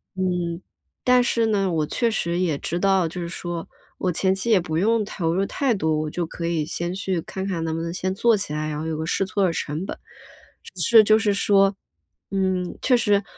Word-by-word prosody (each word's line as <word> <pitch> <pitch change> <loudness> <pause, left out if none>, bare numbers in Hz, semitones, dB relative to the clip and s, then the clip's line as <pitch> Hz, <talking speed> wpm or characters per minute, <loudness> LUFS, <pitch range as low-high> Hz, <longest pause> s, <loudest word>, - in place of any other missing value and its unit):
嗯， 180 -2 -1 0.4
但 250 0 +5
是 230 -1 +1
呢， 200 -3 +1
我 155 -2 +1
确 235 +9 0
实 170 -4 -1
也 170 -6 +1
知 170 +4 -3
道 195 -2 +3
就 170 +3 -6
是 170 - -3
说 175 -1 -5 0.3
我 185 - -1
前 190 +3 +1
期 195 +5 -3
也 210 - +6
不 160 -2 -3
用 220 +5 +2
投 165 -5 -2
入 195 - +1
太 265 +2 0
多， 160 -5 0
我 155 - -3
就 175 +3 -2
可 170 +1 -5
以 165 -3 0
先 175 +2 -3
去 190 -2 -1
看 190 +3 -5
看 180 -4 -2
能 160 0 -2
不 165 - -3
能 170 +1 -4
先 185 +1 -2
做 230 +1 +3
起 190 -6 -4
来， 155 0 -2
然 150 0 -3
后 160 - -4
有 160 - -2
个 160 - -3
试 195 +3 0
错 195 +1 -1
儿 - - +4
的 170 - -1
成 155 +4 -3
本。 - - -6 0.7
只 - - -9
是 225 -3 +7
就 215 +1 +5
是 210 -2 +1
说， 195 0 +3 0.6
嗯， 185 -2 -1
确 255 -2 +4
实 205 -3 +2
185 Hz, 250 characters per minute, -23 LUFS, 165-200 Hz, 0.7 s, 是